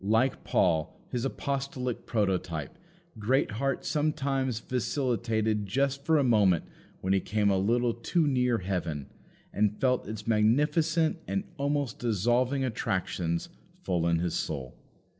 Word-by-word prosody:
Like 115 +6 +2
Paul, 80 -4 +1
his 125 0 -1
apostolic 135 -3 -3
prototype, 95 - -1 0.4
Greatheart 130 +3 0
sometimes 140 -5 0
vacillated 115 -5 -1
just 140 +6 0
for 160 +1 +3
a 145 - +3
moment 105 - +3 0.4
when 95 +1 +1
he 95 - +4
came 105 +1 +1
a 95 - +2
little 120 +4 +2
too 155 +8 0
near 125 -4 +2
heaven, 90 -7 -3 0.4
and 105 0 +1
felt 125 -1 +1
its 105 0 -6
magnificent 150 +9 +2
and 195 - -1
almost 140 -3 -1
dissolving 120 +4 +1
attractions 95 -7 -1 0.3
full 85 -2 0
in 85 0 +3
his 85 +1 -1
soul. 65 -5 -3
115 Hz, 125 wpm, -29 LUFS, 100-135 Hz, 0.4 s, he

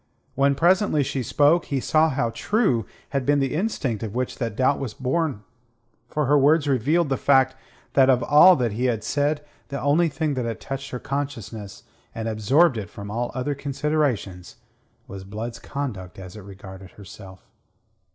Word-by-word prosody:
When 140 +1 +2
presently 175 -1 +3
she 135 0 -3
spoke, 150 +7 +3
he 140 - -2
saw 155 +4 +2
how 130 -4 -1
true 165 - 0 0.2
had 135 -1 -1
been 145 +2 +2
the 135 -1 -1
instinct 150 - -2
of 110 -1 -5
which 130 0 -3
that 115 -4 -3
doubt 130 +3 +2
was 125 -6 -5
born, 135 -3 -1 0.6
for 150 +4 -1
her 145 +2 +4
words 145 +2 +3
revealed 145 +5 +1
the 135 - 0
fact 130 -1 +3 0.4
that 135 -1 +5
of 125 -1 +3
all 165 +5 +7
that 125 -6 -1
he 120 +5 -2
had 115 -4 0
said 145 +1 -1 0.2
the 140 0 -5
only 150 +6 +2
thing 155 0 -2
that 125 -3 -2
had 115 -1 -4
touched 135 0 -6
her 125 - -4
consciousness 120 -7 -5 0.3
and 115 0 -4
absorbed 120 +7 +3
it 100 -5 -5
from 100 0 -8
all 120 +2 -2
other 130 +3 -1
considerations 140 - -2 0.5
was 95 -1 -8
Blood's 110 +4 -6
conduct 115 -12 -6
as 95 0 -10
it 105 - -9
regarded 95 -1 -12
herself. 95 -1 -13
130 Hz, 175 wpm, -23 LUFS, 110-145 Hz, 0.6 s, all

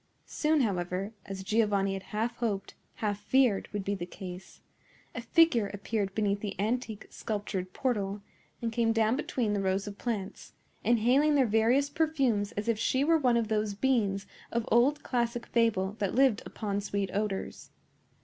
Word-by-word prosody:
Soon, 305 -1 +1
however,—as 195 0 -3
Giovanni 205 -2 +2
had 195 - -4
half 220 +4 -3
hoped, 205 -5 -2 0.2
half 205 -2 -2
feared, 225 -1 +2
would 205 -2 -4
be 200 - 0
the 175 -3 -4
case,—a 180 0 -11
figure 285 -12 +3
appeared 200 -1 -2
beneath 205 -2 +1
the 200 -2 -5
antique 220 0 -2
sculptured 200 -4 -4
portal, 205 -4 -2 0.4
and 230 - 0
came 225 0 +2
down 225 +1 +2
between 245 -6 -1
the 200 - 0
rows 190 +1 0
of 205 -1 -8
plants, 210 -6 -4 0.3
inhaling 250 +6 +4
their 270 -2 +4
various 230 +6 +3
perfumes 270 -11 +1
as 205 +2 -4
if 230 -2 +1
she 260 +4 +2
were 325 +2 +4
one 250 -4 +3
of 230 -2 0
those 210 -1 0
beings 205 -5 +1 0.3
of 235 -1 -1
old 260 +6 +4
classic 235 -1 -1
fable 210 -4 +1
that 200 -1 -1
lived 260 -4 +4
upon 205 -2 -3
sweet 200 -1 -2
odors. 200 -1 -3
215 Hz, 160 wpm, -30 LUFS, 200-240 Hz, 0.4 s, inhaling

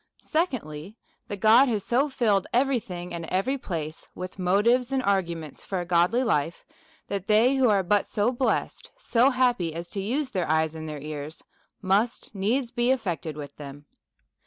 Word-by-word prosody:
Secondly, 215 - -2 0.3
That 200 -2 -6
God 235 +5 +6
has 210 -4 -1
so 270 +5 +2
filled 215 -7 +1
every 260 +1 +3
thing 180 -4 -8
and 170 -1 -4
every 205 +11 -1
place 160 -7 -5
with 185 +1 -7
motives 230 +8 +2
and 265 -1 0
arguments 170 - -2
for 190 - -3
a 175 - -3
godly 180 +8 +2
life, 165 - -1 0.4
that 200 -1 -4
they 220 +5 +4
who 260 -3 +3
are 200 -2 +3
but 205 +3 +2
so 210 +3 +1
blessed, 255 +1 -1
so 255 - +3
happy 245 - +1
as 170 +1 -5
to 200 - -3
use 260 +7 -2
their 180 -7 -2
eyes 160 0 +2
and 160 -1 -7
their 150 - -5
ears, 150 +1 -7 0.4
must 205 +6 0
needs 230 +6 0
be 240 -1 0
affected 175 - -1
with 145 -2 -8
them. 145 0 -10
200 Hz, 175 wpm, -26 LUFS, 170-245 Hz, 0.4 s, God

